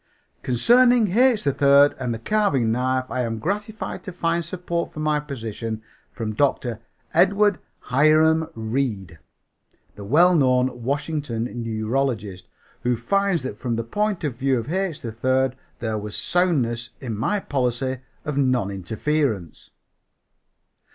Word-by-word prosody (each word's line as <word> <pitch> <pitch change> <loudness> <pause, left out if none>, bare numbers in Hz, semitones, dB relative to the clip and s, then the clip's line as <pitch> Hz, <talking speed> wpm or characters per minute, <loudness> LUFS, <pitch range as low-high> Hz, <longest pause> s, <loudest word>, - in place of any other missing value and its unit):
Concerning 240 - +4
H. 245 +1 +4
3rd 140 0 +4
and 125 -2 -2
the 115 - -2
carving 135 - +1
knife 130 +2 0
I 130 +1 -1
am 115 -2 -2
gratified 205 - -4
to 185 - -5
find 170 -1 -1
support 170 0 -3
for - - -9
my 155 -1 +1
position 115 -6 -5 0.3
from 110 -3 -4
Dr. 120 -2 0 0.3
Edward 195 +1 +3 0.2
Hiram 155 +4 +3
Reede, 110 - -3 0.7
the 100 - -10
well 165 - +5
known 130 -4 +2
Washington 140 -2 -2 0.2
neurologist, 110 -3 -2 0.3
who 125 0 +1
finds 195 - +1
that 110 -5 -6
from 120 -2 -2
the 115 - -2
point 205 - -1
of 145 -6 -2
view 135 0 +1
of 120 +8 -4
H. 190 -5 -2
3rd 130 +3 0 0.2
there 110 -2 -2
was 105 0 -6
soundness 125 -10 0
in 120 -5 -4
my 150 - 0
policy 130 -4 -1 0.3
of 150 -2 -3
non 130 -7 +1
interference. 110 - -2
130 Hz, 130 wpm, -23 LUFS, 115-165 Hz, 0.7 s, well